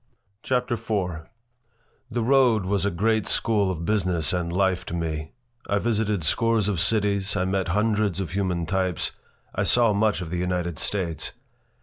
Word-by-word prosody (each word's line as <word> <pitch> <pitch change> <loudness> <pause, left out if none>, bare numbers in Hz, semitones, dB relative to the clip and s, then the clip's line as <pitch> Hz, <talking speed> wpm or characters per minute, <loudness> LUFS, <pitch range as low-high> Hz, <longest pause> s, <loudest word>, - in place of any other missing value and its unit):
CHAPTER 125 -1 0
IV 95 -8 -2 0.8
THE 120 -1 -1
road 125 -5 +4
was 100 +1 +1
a - - +3
great 110 +4 +1
school 105 -4 +1
of 85 -3 -3
business 90 -8 0
and 85 -2 -1
life 95 0 +1
to 85 - -3
me. 80 -2 -3 0.4
I 100 - +2
visited 105 -4 0
scores 115 +5 +2
of 100 -5 0
cities. 100 0 +1
I 95 -2 +1
met 95 0 0
hundreds 105 0 +1
of 95 - -3
human 90 -3 -1
types. 95 -1 -1 0.4
I - - -1
saw 120 -3 +4
much 105 +1 +2
of 85 -2 -6
the 90 - -1
United 90 -2 -2
States. 85 -7 -2
95 Hz, 160 wpm, -25 LUFS, 90-110 Hz, 0.8 s, road